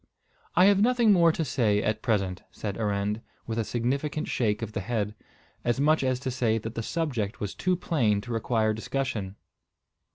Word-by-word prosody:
"I 180 - +7
have 200 0 +5
nothing 235 -2 +5
more 170 -3 +5
to 160 0 -2
say 110 -6 +1
at 105 +1 -1
present," 100 -6 0
said 100 -2 -5
Arend, 105 0 -1 0.2
with 115 0 -2
a - - +1
significant 135 +7 -1
shake 105 -2 0
of 110 - -4
the 105 - -3
head, 105 0 -2 0.5
as 120 +2 0
much 155 +1 +3
as 130 -1 +1
to 130 - -2
say 120 -3 +1
that 115 +1 -5
the 115 - -3
subject 120 -7 -2
was 105 - -3
too 185 -1 0
plain 120 - +1
to 120 +2 -6
require 110 -1 +1
discussion. 110 -4 -3
115 Hz, 185 wpm, -27 LUFS, 105-140 Hz, 0.5 s, I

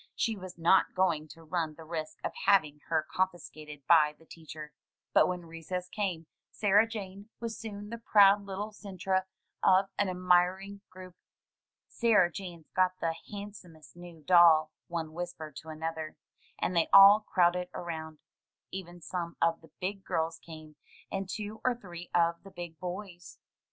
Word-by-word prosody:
She 225 - 0
was 185 -3 -9
not 170 +3 +3
going 170 -5 +1
to 165 +1 -14
run 160 -1 -2
the 165 - -11
risk 155 -1 -5
of - - -2 0.2
having 155 -7 +4
her 160 -1 +1
confiscated 155 -6 -4
by 150 -3 +5
the 165 - -21
teacher. 155 -2 -10 0.4
But - - +6
when 180 -1 -4
recess 165 +2 -6
came 185 -6 -3 0.2
Sarah 210 +1 +3
Jane 200 -2 -8
was 230 -1 -4
soon 205 -1 -8
the 235 - -5
proud 205 -2 +5
little 200 +2 -5
centre 190 -2 -2 0.3
of 190 +1 +4
an 205 -2 +2
admiring 185 +2 +1
group. 185 -1 -12 0.7
"Sarah 210 -7 +3
Jane's 175 -4 -9
got 185 0 +3
the 165 -1 0 0.2
handsomest 200 -7 -10
new 175 -3 -12
doll," 160 -2 +6 0.2
one 165 -2 -4
whispered 165 -4 -6
to 160 - -10
another, 160 0 -5 0.4
and 180 - -2
they 170 - +2
all 195 +2 +10
crowded 180 -3 +1
around. 160 -3 -6 0.5
Even 175 -2 -8
some 170 +1 -5
of 165 0 +1
the 160 - -17
"big 195 +1 -4
girls" 165 -1 -2
came, 155 -2 -12 0.3
and 195 -1 -3
two 215 +2 -5
or 255 -1 +2
three 175 -6 -10
of 170 -1 +2
the 195 - -13
big 175 -4 -9
boys. 180 -1 -7
175 Hz, 155 wpm, -30 LUFS, 165-195 Hz, 0.7 s, all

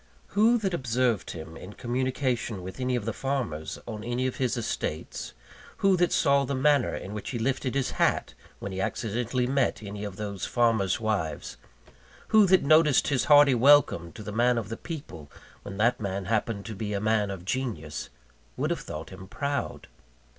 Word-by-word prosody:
Who 225 +4 +4
that 195 -5 -2
observed 125 - 0
him 80 0 -8
in 90 +5 -10
communication 125 -3 -2
with 95 +7 -8
any 125 0 0
of 120 -4 -2
the 115 - -2
farmers 125 - -3
on 110 -1 -6
any 120 +2 -1
of 130 - -2
his 125 -2 0
estates 90 -8 -4 0.4
who 195 -1 +4
that 175 0 +2
saw 140 -2 +3
the 140 +1 -2
manner 145 +2 +3
in 100 - -6
which 105 - -5
he 125 - -3
lifted 130 +2 -1
his 135 -2 0
hat, - - +1 0.2
when 100 - -6
he 95 0 -3
accidentally 120 +5 -1
met 130 -3 0
any 100 0 -6
of 100 -2 -5
those 100 -2 -5
farmers' 115 -6 +2
wives 105 -8 -2 0.7
who 215 -2 +6
that 190 0 +5
noticed 155 -1 +5
his 135 -4 +1
hearty 145 -2 +7
welcome 125 -10 +4
to 110 - -9
the 105 - -6
man 120 +3 +2
of 110 -4 -3
the 115 - -3
people, 115 - -8 0.3
when 100 -1 -8
that 120 +4 +2
man 100 -1 -3
happened 105 0 -1
to 110 - -5
be 105 +1 -3
a 100 - 0
man 105 -1 +1
of 95 -3 -6
genius 95 - -3 0.5
would - - 0
have - - -2
thought 80 +4 -7
him 95 0 -10
proud? 140 +6 -3
120 Hz, 185 wpm, -27 LUFS, 100-135 Hz, 0.7 s, hearty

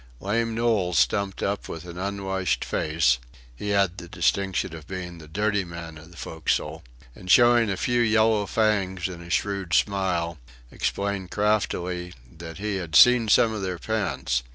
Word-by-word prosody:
Lame 115 +3 -1
Knowles 110 -7 +1
stumped 100 -1 +1
up 100 +1 -2
with 80 +1 -7
an 85 0 -8
unwashed 95 -1 -2
face 75 -6 +1 0.4
(he 105 - -5
had 100 -2 +1
the 85 - -10
distinction 95 -1 0
of 80 -2 -11
being 90 -2 -6
the 80 - -12
dirty 105 +4 0
man 85 -2 -9
of 80 +2 -14
the 85 - -16
forecastle), 80 -2 -2 0.3
and 90 - -12
showing 120 +1 +6
a 95 - -1
few 120 +5 +1
yellow 110 -2 +3
fangs 95 -5 0
in 90 -2 -8
a 85 - -11
shrewd 95 -2 -1
smile, 90 -5 0 0.3
explained 100 -2 -2
craftily 90 -4 -1 0.2
that 80 0 -9
he 105 0 -2
"had 85 -4 -5
seen 125 -2 +7
some 110 +1 +4
of 105 - -4
their 95 -2 -3
pants." 85 - -1
95 Hz, 165 wpm, -25 LUFS, 85-105 Hz, 0.4 s, seen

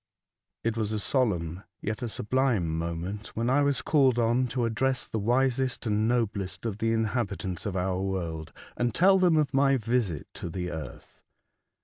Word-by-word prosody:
IT 115 -1 0
was 110 -2 -1
a 110 - -1
solemn 90 - 0 0.2
yet 105 +4 -3
a 120 - -2
sublime 110 -8 0
moment 85 +6 -4
when 115 +2 0
I 145 +2 +4
was 140 -2 +1
called 135 -5 +4
on 120 +2 +2
to 120 0 -1
address 130 +3 0
the 110 - -3
wisest 130 +3 +1
and 110 0 +1
noblest 110 -5 -1
of 110 -2 -3
the 115 0 +1
inhabitants 105 -6 -1
of 100 - -3
our 95 0 0
world, 85 -5 -3 0.2
and 120 -2 -1
tell 190 +2 +5
them 175 -3 +4
of 150 -3 +1
my 135 0 +4
visit 115 - -1
to 85 - -6
the 90 +1 -4
earth. 80 -1 -8
115 Hz, 170 wpm, -28 LUFS, 95-130 Hz, 0.2 s, tell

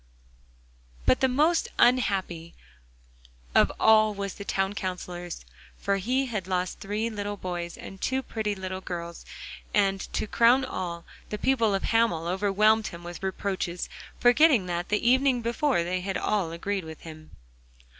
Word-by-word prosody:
But - - +4
the 265 - +3
most 305 +6 +2
unhappy 195 -9 +1 1.0
of - - +5
all 215 -1 +5
was 200 -1 -4
the 200 - -8
Town 195 0 -1
Counsellor, 180 -3 -5 0.5
for 200 - 0
he 255 +7 0
lost 185 0 -2
three 210 +3 -2
little 205 -1 -4
boys 175 -2 -5
and 195 - -10
two 265 0 0
pretty 215 -3 -2
little 185 0 -5
girls, 170 -2 -6 0.5
and 195 -2 +3
to - - -1
crown 240 +5 +4
all, 175 -7 -5 0.2
the 210 - -3
people 230 -3 +2
of 195 - -2
Hamel 225 -8 +2
overwhelmed 205 +4 +2
him 170 0 -9
with 175 0 -8
reproaches, 190 -2 -3 0.3
forgetting 245 - +5
that 175 0 -3
the 210 +3 +1
evening 260 -1 +3
before 240 - +1
they 180 +1 -2
had 190 0 -2
all 195 -6 0
agreed 190 +3 -3
with 160 -1 -10
him. 155 -1 -12
200 Hz, 145 wpm, -27 LUFS, 180-225 Hz, 1.0 s, of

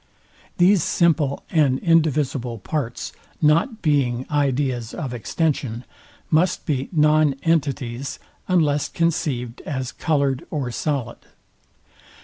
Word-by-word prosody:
These 180 +1 +5
simple 155 -4 +1
and 145 -6 +3
indivisible 145 -7 +1
parts, 135 +2 -4 0.3
not 165 - +2
being 130 -5 +1
ideas 135 -5 0
of 135 -7 -4
extension, 120 - -2 0.5
must 165 +4 +2
be 135 -4 -1
non 150 -3 +3
entities, 140 -5 -1 0.3
unless 150 -6 +2
conceived 135 -8 -1
as 130 -3 -4
coloured 140 -2 0
or 140 -6 -3
solid. 140 0 -2
145 Hz, 100 wpm, -22 LUFS, 130-155 Hz, 0.5 s, These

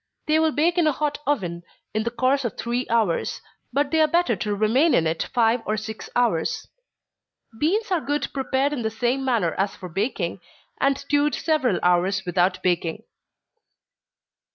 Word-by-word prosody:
They 310 +1 +3
will 320 0 +3
bake 335 +4 +2
in 330 - +3
a - - +4
hot 295 +1 -2
oven, 180 -12 -1 0.3
in 215 - 0
the - - +1
course 260 +3 +1
of 235 - -4
three 240 +2 -2
hours 220 -7 +1 0.3
but 280 +2 0
they 320 -1 +3
are 310 - +5
better 335 -6 +2
to 205 +2 -2
remain 245 +10 +3
in 165 - +3
it 160 +1 -1
five 230 0 +2
or 215 0 -1
six 220 +1 -6
hours. 225 -10 0 0.9
Beans 390 +7 +1
are 355 -3 +2
good 290 +1 -1
prepared 270 +1 0
in 270 - -3
the 220 - 0
same 245 +4 -1
manner 230 -11 +1
as 195 +1 0
for 180 - -9
baking, 195 -1 -2 0.4
and 275 0 +2
stewed 290 0 +1
several 300 - +1
hours 180 +2 +2
without 180 +1 +1
baking. 175 +2 0
240 Hz, 175 wpm, -24 LUFS, 195-290 Hz, 0.9 s, are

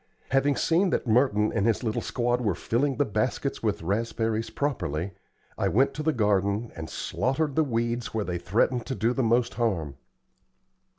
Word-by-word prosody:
Having 135 +2 +3
seen 180 +4 +2
that - - 0
Merton 110 -3 +3
and 100 - +1
his 115 +2 +1
little 110 -2 -1
squad 120 0 0
were 105 -7 0
filling 130 +9 0
the 145 - +2
baskets 105 - -1
with - - -1
raspberries 110 +3 -1
properly, 95 - -2 0.5
I - - +2
went 130 +6 +3
to 155 - -4
the 160 +1 +2
garden 105 -2 +1
and 80 -1 -6
slaughtered 135 - -1
the 160 - +4
weeds 120 -2 -1
where 110 -2 -2
they 90 -1 -3
threatened 115 +6 +1
to 130 - -2
do 115 +1 +1
the 135 - 0
most 120 +1 +2
harm. 85 - -1
115 Hz, 175 wpm, -27 LUFS, 105-130 Hz, 0.5 s, the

